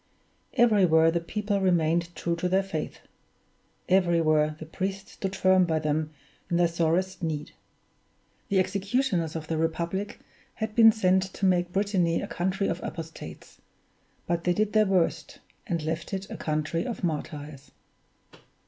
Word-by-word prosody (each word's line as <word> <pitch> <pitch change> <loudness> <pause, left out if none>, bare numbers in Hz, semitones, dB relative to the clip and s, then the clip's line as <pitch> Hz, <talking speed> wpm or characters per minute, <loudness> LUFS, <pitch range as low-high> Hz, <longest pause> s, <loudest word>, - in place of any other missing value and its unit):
Everywhere 180 -9 +5
the 170 - 0
people 205 +3 -2
remained 170 -1 +1
true 170 0 -1
to 180 +1 -1
their 190 +2 +2
Faith; 170 -5 -5 0.9
everywhere 165 -5 +3
the 160 - -8
priests 190 +4 -4
stood 195 0 -4
firm 185 -1 +4
by 165 -3 +1
them 155 0 -1 0.4
in 170 - +1
their 175 0 +4
sorest 170 +3 0
need. 155 -3 -3 1.0
The 200 - +2
executioners 190 - 0
of 160 -1 -4
the 160 0 -2
Republic 170 +5 -2 0.4
had 220 -1 -3
been 225 0 +8
sent 190 -3 +1
to 195 - -1
make 180 -1 +2
Brittany 190 -4 +1
a - - -3
country 190 +3 -1
of 170 0 -2
apostates; 160 - -8 0.7
they 175 +1 +1
did 210 +2 0
their 215 -1 +4
worst, 185 -3 0 0.3
and 170 -6 -2
left 160 +5 -3
it 195 0 -6
a - - -4
country 155 +2 -1
of 235 -4 -5
martyrs. 150 -3 -4
175 Hz, 145 wpm, -27 LUFS, 160-195 Hz, 1.0 s, been